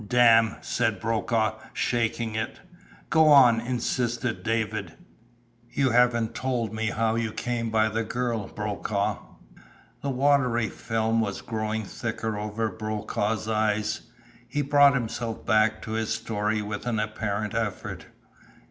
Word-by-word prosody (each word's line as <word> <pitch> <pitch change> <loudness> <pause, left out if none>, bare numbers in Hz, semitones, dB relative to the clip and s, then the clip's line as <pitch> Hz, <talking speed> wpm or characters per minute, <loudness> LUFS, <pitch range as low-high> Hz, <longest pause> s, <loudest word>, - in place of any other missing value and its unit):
"Dam'!" 115 -2 +5
said 110 -5 0
Brokaw, 110 0 0
shaking 115 -1 -1
it. 110 0 -3 0.5
"Go 160 -1 +5
on," 130 -6 +7
insisted 120 -1 -1
David. 110 -1 -2 0.8
"You 135 -3 +1
haven't 120 -2 +3
told 120 -5 -2
me 110 0 -1
how 110 +1 +1
you 115 -1 -1
came 115 0 -2
by 110 0 +3
the 110 +1 -1
girl, 115 -2 -2
Brokaw?" 105 -1 -2 0.8
The 140 - -2
watery 130 -4 +2
film 115 0 0
was 100 -3 -3
growing 110 -1 -2
thicker 110 +1 -4
over 105 +1 -2
Brokaw's 110 +1 -2
eyes. 110 0 0 0.5
He 145 +4 -1
brought 145 0 +5
himself 115 -2 -3
back 110 0 +2
to - - -6
his 110 0 -1
story 105 0 -1
with 105 +3 -5
an 115 -3 0
apparent 105 -1 -2
effort. 110 -4 -3
110 Hz, 130 wpm, -26 LUFS, 110-120 Hz, 0.8 s, on